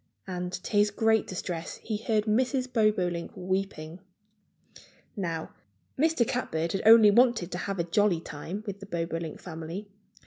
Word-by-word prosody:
And 180 Hz, -1 st, -4 dB
to 180 Hz, -, -6 dB
his 205 Hz, 0 st, +5 dB
great 220 Hz, +1 st, +2 dB
distress 175 Hz, -2 st, -4 dB
he 215 Hz, -2 st, -4 dB
heard 215 Hz, 0 st, 0 dB
Mrs. 255 Hz, +4 st, +1 dB
Bobolink 185 Hz, -7 st, +1 dB
weeping. 185 Hz, -3 st, -3 dB, 1.2 s
Now, 165 Hz, -6 st, -3 dB, 0.4 s
Mr. 305 Hz, -5 st, +2 dB
Catbird 165 Hz, -9 st, -1 dB
had 195 Hz, -, -1 dB
only 220 Hz, -2 st, +9 dB
wanted 235 Hz, -6 st, +3 dB
to 180 Hz, -, -3 dB
have 195 Hz, +1 st, -3 dB
a 170 Hz, -, +1 dB
jolly 175 Hz, +1 st, +2 dB
time 170 Hz, +6 st, -7 dB
with 200 Hz, -2 st, -5 dB
the 200 Hz, -, -10 dB
Bobolink 165 Hz, -2 st, -3 dB
family. 175 Hz, +4 st, -7 dB
195 Hz, 145 wpm, -28 LUFS, 170-215 Hz, 1.2 s, only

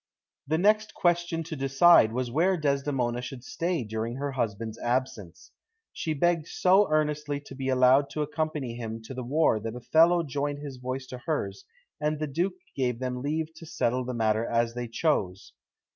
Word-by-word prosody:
The 160 Hz, +2 st, +1 dB
next 215 Hz, +4 st, +2 dB
question 175 Hz, -1 st, +1 dB
to 160 Hz, 0 st, -6 dB
decide 135 Hz, -2 st, +5 dB
was 125 Hz, 0 st, -2 dB
where 180 Hz, +7 st, +2 dB
Desdemona 140 Hz, -5 st, 0 dB
should 125 Hz, 0 st, -8 dB
stay 170 Hz, 0 st, -2 dB
during 110 Hz, +2 st, -4 dB
her 140 Hz, +1 st, -3 dB
husband's 115 Hz, -3 st, -3 dB
absence. 120 Hz, -8 st, -3 dB, 0.4 s
She 155 Hz, -1 st, -2 dB
begged 170 Hz, +1 st, +1 dB
so 190 Hz, +3 st, +3 dB
earnestly 150 Hz, -1 st, 0 dB
to 145 Hz, -, -12 dB
be 135 Hz, 0 st, -3 dB
allowed 130 Hz, +2 st, +4 dB
to 150 Hz, +1 st, -2 dB
accompany 150 Hz, -4 st, -3 dB
him 115 Hz, -1 st, -6 dB
to 115 Hz, -, -8 dB
the 130 Hz, -, -5 dB
war 140 Hz, -2 st, +2 dB
that 115 Hz, +2 st, -5 dB
Othello 165 Hz, +7 st, +4 dB
joined 145 Hz, 0 st, -2 dB
his 145 Hz, -3 st, -7 dB
voice 130 Hz, +1 st, -4 dB
to 125 Hz, -1 st, -8 dB
hers, 160 Hz, -, -3 dB, 0.3 s
and 150 Hz, 0 st, 0 dB
the 155 Hz, -, -2 dB
Duke 175 Hz, +6 st, -1 dB, 0.2 s
gave 125 Hz, -3 st, 0 dB
them 125 Hz, 0 st, -3 dB
leave 155 Hz, +3 st, -2 dB
to 160 Hz, 0 st, -12 dB
settle 125 Hz, -3 st, 0 dB
the 125 Hz, 0 st, -4 dB
matter 110 Hz, -1 st, +1 dB
as 115 Hz, 0 st, 0 dB
they 120 Hz, 0 st, -4 dB
chose. 105 Hz, -, -1 dB
135 Hz, 175 wpm, -27 LUFS, 120-155 Hz, 0.4 s, decide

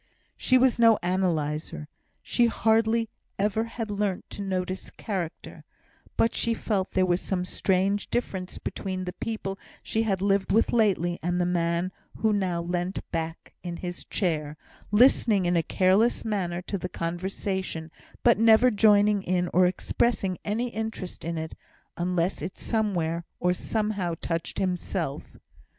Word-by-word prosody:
She 255 Hz, -, +3 dB
was 255 Hz, -2 st, +3 dB
no 230 Hz, -2 st, +7 dB
analyser; 160 Hz, -5 st, -1 dB, 0.4 s
she 240 Hz, -1 st, +3 dB
hardly 225 Hz, 0 st, +2 dB, 0.3 s
even 210 Hz, +2 st, +1 dB
had 230 Hz, -2 st, -5 dB
learnt 200 Hz, -2 st, -1 dB
to -, -, -6 dB
notice 185 Hz, -1 st, -3 dB
character; 185 Hz, -6 st, -5 dB, 0.5 s
but 225 Hz, -, +3 dB
she 230 Hz, 0 st, 0 dB
felt 200 Hz, -4 st, -1 dB
there 185 Hz, 0 st, +3 dB
was 180 Hz, 0 st, +1 dB
some 180 Hz, -2 st, -2 dB
strange 195 Hz, +2 st, 0 dB
difference 190 Hz, -6 st, -3 dB
between 185 Hz, -2 st, -4 dB
the 180 Hz, 0 st, -4 dB
people 195 Hz, -2 st, -4 dB, 0.2 s
she 220 Hz, -, 0 dB
had 200 Hz, -4 st, 0 dB
lived 200 Hz, -1 st, +2 dB
with 225 Hz, -, +3 dB
lately 190 Hz, -7 st, +2 dB
and 175 Hz, +2 st, 0 dB
the 175 Hz, -, +2 dB
man 170 Hz, +1 st, 0 dB, 0.3 s
who 220 Hz, -1 st, +2 dB
now 180 Hz, -4 st, 0 dB
leant 175 Hz, +2 st, -3 dB
back 165 Hz, 0 st, -4 dB
in 175 Hz, -1 st, -5 dB
his 175 Hz, 0 st, -5 dB
chair, 155 Hz, -6 st, -1 dB, 0.3 s
listening 210 Hz, -3 st, +4 dB
in 175 Hz, 0 st, +2 dB
a 170 Hz, -, +4 dB
careless 190 Hz, +9 st, +2 dB
manner 180 Hz, -5 st, -1 dB
to 200 Hz, +1 st, -3 dB
the 180 Hz, -, -4 dB
conversation, 175 Hz, -1 st, -3 dB, 0.3 s
but 235 Hz, -3 st, +5 dB
never 225 Hz, +2 st, +6 dB
joining 205 Hz, -1 st, +5 dB
in, 180 Hz, -1 st, 0 dB
or 180 Hz, +1 st, +6 dB
expressing 190 Hz, 0 st, 0 dB
any 230 Hz, +4 st, -1 dB
interest 220 Hz, -5 st, -5 dB
in 170 Hz, 0 st, -3 dB
it, 160 Hz, 0 st, -4 dB, 0.4 s
unless 175 Hz, -1 st, 0 dB
it 175 Hz, +5 st, -5 dB
somewhere, 175 Hz, -7 st, -1 dB, 0.2 s
or 180 Hz, 0 st, +2 dB
somehow, 205 Hz, -3 st, -1 dB
touched 165 Hz, 0 st, -3 dB
himself. 180 Hz, -5 st, -2 dB
190 Hz, 145 wpm, -27 LUFS, 175-215 Hz, 0.5 s, no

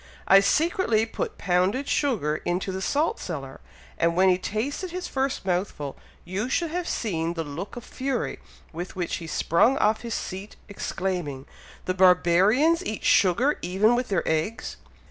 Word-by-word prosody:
I 195 Hz, -, +8 dB
secretly 300 Hz, -, +2 dB
put 435 Hz, -, -4 dB
pounded 190 Hz, +9 st, +1 dB
sugar 190 Hz, -, 0 dB
into 180 Hz, +4 st, -2 dB
the 190 Hz, 0 st, -4 dB
salt 295 Hz, +10 st, 0 dB
cellar, 135 Hz, -6 st, -6 dB, 0.4 s
and 170 Hz, 0 st, +2 dB
when 190 Hz, +1 st, +5 dB
he 180 Hz, -, +4 dB
tasted 265 Hz, -, -3 dB
his 360 Hz, +1 st, -5 dB
first 265 Hz, -5 st, -2 dB
mouthful, 175 Hz, -6 st, -2 dB, 0.3 s
you 195 Hz, +7 st, -3 dB
should 325 Hz, +4 st, 0 dB
have 355 Hz, +1 st, -2 dB
seen 170 Hz, -6 st, -2 dB
the 165 Hz, -, -2 dB
look 160 Hz, +7 st, -7 dB
of 240 Hz, -, -7 dB
fury 265 Hz, -1 st, -3 dB, 0.3 s
with 175 Hz, +3 st, -6 dB
which 180 Hz, -2 st, -2 dB
he 165 Hz, -, -8 dB
sprung 170 Hz, -, +2 dB
off 215 Hz, +1 st, +2 dB
his 235 Hz, -1 st, -4 dB
seat, 195 Hz, +2 st, -6 dB
exclaiming, 180 Hz, -8 st, -3 dB, 0.4 s
'the 185 Hz, -, 0 dB
barbarians 190 Hz, -, +4 dB
eat 220 Hz, -, -4 dB
sugar 235 Hz, -, +3 dB
even 195 Hz, +6 st, +2 dB
with 250 Hz, +1 st, -1 dB
their 195 Hz, -4 st, -1 dB
eggs!'" 160 Hz, +8 st, -2 dB
195 Hz, 160 wpm, -25 LUFS, 175-255 Hz, 0.4 s, I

